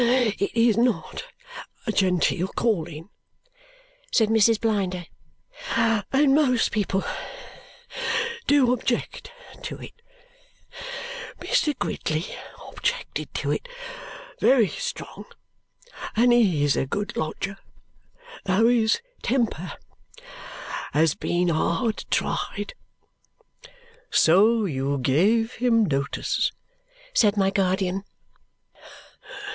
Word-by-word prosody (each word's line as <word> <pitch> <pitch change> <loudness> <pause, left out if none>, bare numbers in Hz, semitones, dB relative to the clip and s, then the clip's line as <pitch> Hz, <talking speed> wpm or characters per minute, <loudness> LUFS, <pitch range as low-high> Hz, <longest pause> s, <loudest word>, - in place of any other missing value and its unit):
It 235 -3 +1
is 230 -1 +4
NOT 240 -1 0 0.6
a 220 - 0
genteel 185 -2 +2
calling," 170 -6 -2 1.0
said 220 -3 +3
Mrs. 225 0 +4
Blinder, 190 -5 -1 0.7
"and 230 +5 +3
most 265 -5 +3
people 195 -2 0 1.4
do 275 -4 +5
object 255 - -2 0.3
to - - -5
it. - - -10 1.5
Mr. 310 - +1
Gridley 155 -6 -2 0.4
objected - - -3
to - - -1
it - - -2 0.7
very 245 -6 +5
strong, - - -6 0.9
and 240 +2 +5
he 190 -11 +3
is 145 -1 +3
a 135 - 0
good 205 +8 -3
lodger, 195 +5 -3 0.9
though 195 +4 +3
his 225 -2 +3 0.2
temper 230 -8 -1 1.2
has 155 0 +4
been 175 0 0
hard 170 +7 0
tried." - - -2 1.4
"So 210 +7 +5
you 140 -4 -1
gave 195 - +2
him 230 -3 +4
notice?" 140 -4 0 0.6
said 210 - +4
my 195 -1 +3
guardian. 190 0 0
210 Hz, 90 wpm, -25 LUFS, 180-235 Hz, 1.5 s, do